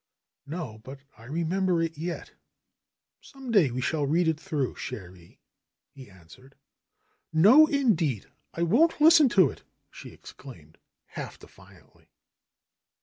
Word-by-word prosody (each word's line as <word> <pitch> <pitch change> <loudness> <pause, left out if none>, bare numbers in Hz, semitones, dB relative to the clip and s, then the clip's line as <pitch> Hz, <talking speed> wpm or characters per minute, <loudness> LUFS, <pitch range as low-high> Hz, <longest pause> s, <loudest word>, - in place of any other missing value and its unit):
"No, 145 -9 -7
but 135 +5 -12
I 115 - -17
remember 170 +5 -1
it 165 -1 -2
yet. 170 +3 -6 0.9
Some 270 -3 -10
day 190 - +4
we 125 +1 -4
shall 145 +3 -1
read 165 +4 +1
it 160 -1 0
through, 145 -5 -3
cherie," 90 -7 -10 0.5
he 130 -5 -14
answered. 95 +9 -18 0.8
"No, 220 - +6
indeed! 185 - 0 0.3
I 170 - -1
won't 290 - +2
listen 310 -2 +6
to 185 - +3
it," - - -15 0.3
she - - -11
exclaimed, 80 - -15 0.3
half - - -9
defiantly. - - -20
160 Hz, 125 wpm, -26 LUFS, 130-190 Hz, 0.9 s, No